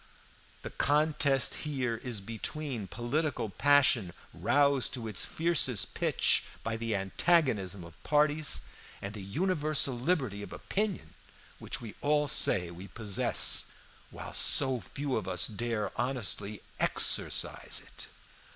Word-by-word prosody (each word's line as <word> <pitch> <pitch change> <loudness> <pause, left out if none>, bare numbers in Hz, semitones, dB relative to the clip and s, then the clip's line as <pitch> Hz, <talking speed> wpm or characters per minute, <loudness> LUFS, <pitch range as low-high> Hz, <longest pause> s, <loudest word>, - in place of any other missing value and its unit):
"The - - -6
contest 145 -2 +2
here 130 -6 -2
is 115 -3 -5
between 115 +2 -4
political 120 - -2
passion 135 -5 +3 0.2
roused 140 -2 +2
to 115 -3 -6
its 105 - -1
fiercest 160 - +1
pitch - - +1 0.2
by 115 0 -2
the 115 -1 -2
antagonism 100 - +1
of 85 -1 -15
parties, 150 0 +2 0.4
and 100 +1 -6
the 105 - -8
universal 155 - 0
liberty 125 - -1
of - - -9
opinion, 195 - -3 0.5
which - - -3
we 115 -3 -8
all 150 0 +1
say 90 -9 +2
we 90 +3 -10
possess, 105 0 +2 0.4
while - - -9
so 130 -3 +5
few 135 +8 -4
of - - -4
us 90 -1 +2
dare 110 -2 -3
honestly 105 -5 -2 0.2
exercise - - -1
it. - - -11
125 Hz, 125 wpm, -30 LUFS, 105-145 Hz, 0.5 s, so